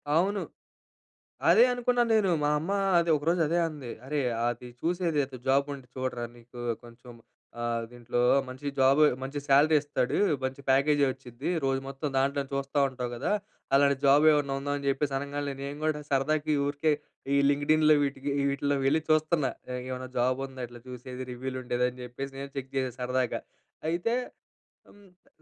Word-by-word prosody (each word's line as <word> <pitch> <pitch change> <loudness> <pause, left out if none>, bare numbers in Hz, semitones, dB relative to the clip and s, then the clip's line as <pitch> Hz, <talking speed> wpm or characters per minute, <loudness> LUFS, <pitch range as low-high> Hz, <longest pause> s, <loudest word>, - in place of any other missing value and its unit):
అవును. 195 +4 +2 1.1
అదే 215 +8 +7
అనుకున్నా 245 0 +1
నేను. 210 -4 +3
మా 145 - +2
అమ్మ 160 +5 -4 0.3
అదే, 170 0 +1
ఒకరోజు 165 +4 0
అదే 170 +3 +1
అంది. 145 -6 -8 0.2
"అరే! 150 +1 -1 0.3
అది 120 +1 -5
చూసేదేదో 160 -6 -1
జాబుంటే 140 0 +1
చూడరా. 130 -2 -2
నీకు, 120 +1 -14 0.3
కొంచెం 120 +1 -14 0.5
ఆహ్, 115 -1 -1
దీంట్లో, 120 0 -3 0.3
మంచి 130 +3 -8
జాబు, 135 +3 +5 0.2
మంచి 135 +2 -4
శాలరీ 145 +3 +5
ఇస్తాడు, 145 -3 -1 0.3
మంచి 130 +1 -3
ప్యాకేజీ 140 +2 +4
వచ్చుద్ది, 130 +2 -6
రోజు 135 0 +1
మొత్తం 135 +2 -4
దాంట్లోనే 140 +1 +1
చూస్తా 140 +1 -2
ఉంటావు 125 -2 -5
గదా! 120 - -2 0.4
అలాంటి 140 0 +5
జాబ్ 145 +2 +6
ఏమన్నా 145 -2 +1
ఉందా?" 145 +1 -2
అని 140 - -6
జెప్పేసి 140 0 0
అనంగాల్నే, 140 0 -3
నేను 140 +1 -5
గూడా, 155 -1 0
సరదాకి 150 +3 +1
ఊరికే, 145 +2 +1 0.4
ఈ - - +4
లింక్డ్ 145 +1 +2
ఇన్‌లో 155 0 +5
వీటికి 140 0 -2
ఈ - - +1
వీటిల్లో 140 +1 0
వెళ్లి 145 +4 +3
చూస్తన్నా. 155 -3 +2 0.4
ఏమన్నా 130 0 -5
జాబ్ 130 +2 +1
ఉందా 130 -2 -7
ఇట్లా 120 0 -12
చూసేది? 125 +1 -7
రివ్యూలు 130 +1 -5
ఉండేది, 125 0 0
అని 125 - -15
చెప్పేసి, 135 +3 -6
నేను 140 0 -6
చెక్ 135 -1 -5
జేశా 130 -2 0
సరదాగా. 125 0 -1 0.5
అయితే 175 +8 0 0.8
హ్మ్, 205 - -18 0.2
ప్ - - -35
140 Hz, 160 wpm, -28 LUFS, 130-150 Hz, 1.1 s, అదే